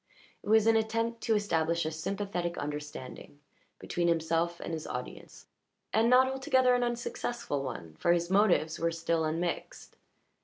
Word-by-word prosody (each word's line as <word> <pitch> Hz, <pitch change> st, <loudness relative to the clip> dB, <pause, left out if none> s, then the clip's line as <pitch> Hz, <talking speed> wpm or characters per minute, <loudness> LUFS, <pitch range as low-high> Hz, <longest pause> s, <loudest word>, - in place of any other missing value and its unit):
It -, -, -8 dB
was 220 Hz, 0 st, +5 dB
an 225 Hz, 0 st, +5 dB
attempt 230 Hz, +1 st, 0 dB
to 225 Hz, -, +1 dB
establish 170 Hz, -5 st, 0 dB
a 155 Hz, -, -1 dB
sympathetic 175 Hz, +1 st, -3 dB
understanding 145 Hz, -1 st, -7 dB, 0.4 s
between 175 Hz, 0 st, -2 dB
himself 165 Hz, +1 st, 0 dB
and 170 Hz, -, -5 dB
his 160 Hz, -1 st, -4 dB
audience, 125 Hz, 0 st, -7 dB, 0.5 s
and 225 Hz, +2 st, +4 dB
not 255 Hz, +1 st, +6 dB
altogether 260 Hz, -1 st, +2 dB
an 245 Hz, 0 st, +2 dB
unsuccessful 240 Hz, -, -3 dB
one, 85 Hz, -, -6 dB
for 170 Hz, -, +3 dB
his 170 Hz, 0 st, +2 dB
motives 190 Hz, -5 st, +3 dB
were 170 Hz, -, +1 dB
still 165 Hz, 0 st, -1 dB
unmixed. 165 Hz, +2 st, -3 dB
175 Hz, 150 wpm, -30 LUFS, 160-225 Hz, 0.5 s, not